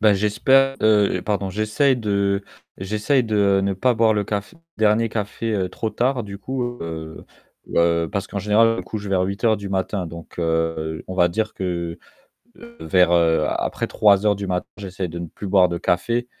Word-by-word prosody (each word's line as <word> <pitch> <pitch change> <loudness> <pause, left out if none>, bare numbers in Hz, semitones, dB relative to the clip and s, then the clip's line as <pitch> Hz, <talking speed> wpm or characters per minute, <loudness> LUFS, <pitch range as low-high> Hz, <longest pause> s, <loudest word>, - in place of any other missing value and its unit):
Bah, 105 -1 +5
j'espère, 130 +7 +3
heu, 105 -4 +3
pardon, 100 -2 -1
j'essaie 110 +8 +1
de 100 -4 0 0.4
j'essaie 105 +8 0
de 100 -3 +2
ne 100 0 0
pas 125 +6 +2
boire 110 0 +3
le 105 -1 0
café 100 - -4 0.2
dernier 110 +1 +2
café 105 -2 -2
trop 110 - -3
tard, 125 +2 -1
du 100 -1 -8
coup, 130 +6 -4 0.2
heu 80 -1 -7 0.5
heu, 85 -1 +2
parce 100 -1 -3
qu'en 100 - -4
général, 110 +3 +3
je - - -5
me - - -3
couche 105 +3 -6
vers 95 -2 +1
08:00 110 +4 +1
du 100 -1 -7
matin, 95 -1 -2
donc 85 +1 -11
heu, 80 -1 -1
on 95 - -6
va 90 -1 +4
dire 110 +5 -2
que 85 -3 -3 0.8
vers 90 -2 +3
heu, 85 -1 +3
après - - -2
03:00 105 0 +3
du 100 -1 -5
matin, 90 -1 -1
j'essaie 95 -2 -5
de 85 +1 -6
ne 85 - -4
plus 100 - -8
boire 95 -2 +4
de 85 - -3
café 115 +9 0
100 Hz, 185 wpm, -22 LUFS, 90-110 Hz, 0.8 s, Bah